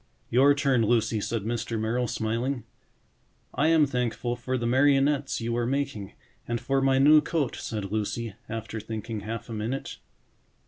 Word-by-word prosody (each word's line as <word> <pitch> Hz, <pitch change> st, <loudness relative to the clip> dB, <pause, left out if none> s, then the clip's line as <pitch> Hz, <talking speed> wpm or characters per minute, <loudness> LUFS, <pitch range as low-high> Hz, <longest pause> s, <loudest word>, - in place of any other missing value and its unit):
"Your 140 Hz, +4 st, +5 dB
turn, 135 Hz, -4 st, +2 dB
Lucy," 115 Hz, -1 st, +1 dB
said 115 Hz, 0 st, -2 dB
Mr. 115 Hz, 0 st, -2 dB
Merrill, 120 Hz, +3 st, 0 dB
smiling. 115 Hz, +4 st, -2 dB, 0.9 s
"I 145 Hz, -, +2 dB
am 160 Hz, -2 st, +5 dB
thankful 125 Hz, -2 st, -2 dB
for 130 Hz, +1 st, -2 dB
the 120 Hz, -, -3 dB
marionettes 135 Hz, +2 st, +2 dB
you 115 Hz, +1 st, -1 dB
are 120 Hz, 0 st, 0 dB
making 135 Hz, -7 st, -2 dB, 0.3 s
and 120 Hz, 0 st, -1 dB
for 135 Hz, +3 st, 0 dB
my 135 Hz, 0 st, +3 dB
new 150 Hz, +3 st, +7 dB
coat," 150 Hz, -7 st, -1 dB
said 105 Hz, -3 st, -5 dB
Lucy, 110 Hz, +1 st, -2 dB, 0.2 s
after 115 Hz, 0 st, -5 dB
thinking 110 Hz, +1 st, -5 dB
half 115 Hz, +3 st, -6 dB
a 115 Hz, -, -6 dB
minute. 115 Hz, +5 st, -4 dB
120 Hz, 155 wpm, -27 LUFS, 110-135 Hz, 0.9 s, new